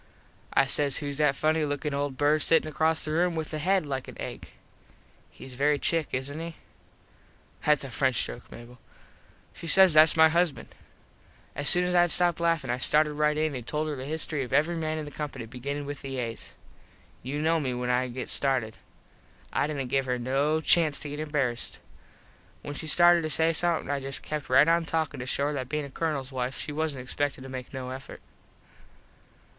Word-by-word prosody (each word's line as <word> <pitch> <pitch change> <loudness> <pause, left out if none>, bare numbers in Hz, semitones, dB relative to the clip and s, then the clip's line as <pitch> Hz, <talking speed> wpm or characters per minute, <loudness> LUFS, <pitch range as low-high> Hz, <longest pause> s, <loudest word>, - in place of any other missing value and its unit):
I - - +4
says 140 +1 +3
whose 145 -2 -3
that 150 -2 +2
funny 155 +2 +1
lookin 145 0 -2
old 140 -1 -2
bird 150 +2 +2
sittin 165 +1 +3
across 160 +1 0
the 155 - -3
room 170 +2 +1
with 160 0 -4
a 155 - -2
head 185 +2 +1
like 135 -2 -4
an - - -11
egg. - - -7 0.8
Hes 130 - -12
very 145 +3 +2
chic 165 -3 0
isnt 140 +4 -3
he? 165 -1 -6 1.1
(Thats 150 -1 +4
a 135 - -7
French 130 -1 +2
joke - - -9
Mable.) 120 +1 -12 0.7
She 170 - -9
says 190 +2 +7
"Thats 155 +1 +6
my 160 0 +8
husband." 165 -4 0 0.9
As 145 -1 +1
soon 180 - +3
as 180 0 -1
Id 175 0 +4
stopped 175 0 +2
laffin 165 -7 0
I 125 - -2
started 150 +3 +2
right 150 0 +1
in 155 -1 0
an 125 -3 -5
told 155 +5 -2
her 150 - -3
the 130 -1 -7
history 155 0 -3
of 125 - -5
every 160 +4 +2
man 155 -1 -2
in 155 - -4
the 145 - -9
company 140 -6 -6
beginnin 140 +5 -5
with 145 0 -6
the 135 -1 -5
As. 115 -2 -5 0.7
You 135 +4 -4
know 160 +2 +2
me 130 -4 -2
when 125 0 -1
I 125 +1 +1
get 125 +1 -6
started. 130 -6 +1 0.8
I - - +1
didnt 140 -4 -4
give 135 -1 +1
her 125 0 0
no 140 +6 0
chanst 160 -2 +3
to 150 - -6
get 145 +1 -6
embarassed. 145 -6 -1 0.9
When 145 - -6
she 155 +2 -5
started 175 +2 +6
to 155 - -3
say 160 +1 +3
somethin 170 -2 0
I 140 - -1
just 135 0 -1
kept 150 -2 -5
right 130 +4 +6
on 170 0 +3
talkin 160 -3 -2
just 125 +1 -5
to - - -1
show 140 - 0
her 150 - -1
that 130 -3 -4
bein 150 -1 -2
a 140 - -11
Colonels 140 -4 -3
wife 130 0 -3
she 150 - -5
wasnt 150 -4 -3
expected 135 +2 -2
to 135 - -9
make 130 -1 -7
no 130 -1 -6
effort. 130 +1 -9
145 Hz, 205 wpm, -27 LUFS, 135-160 Hz, 1.1 s, my